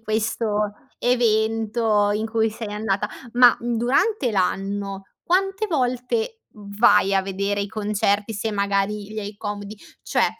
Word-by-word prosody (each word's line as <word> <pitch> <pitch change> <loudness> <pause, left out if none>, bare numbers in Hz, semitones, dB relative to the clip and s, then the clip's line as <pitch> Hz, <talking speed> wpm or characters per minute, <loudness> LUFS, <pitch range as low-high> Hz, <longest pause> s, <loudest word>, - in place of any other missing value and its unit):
questo 215 -1 -1 0.3
evento 220 -2 +2
in 215 +1 -1
cui 225 0 +1
sei 220 0 -6
andata. 210 -1 -1 0.3
Ma, 245 -1 +7
mhmm, 240 0 -1
durante 260 - +1
l'anno, 195 0 -1 0.2
quante 390 +3 +1
volte 315 - -1 0.2
vai 200 -1 +3
a 195 - +4
vedere 200 +1 -2
i 200 - -1
concerti, 205 0 0
se 220 +1 -2
magari 200 0 -1
li 215 0 -6
hai 205 0 -7
comodi? 205 0 -6 0.3
Cioè - - +2
215 Hz, 135 wpm, -23 LUFS, 205-235 Hz, 0.3 s, Ma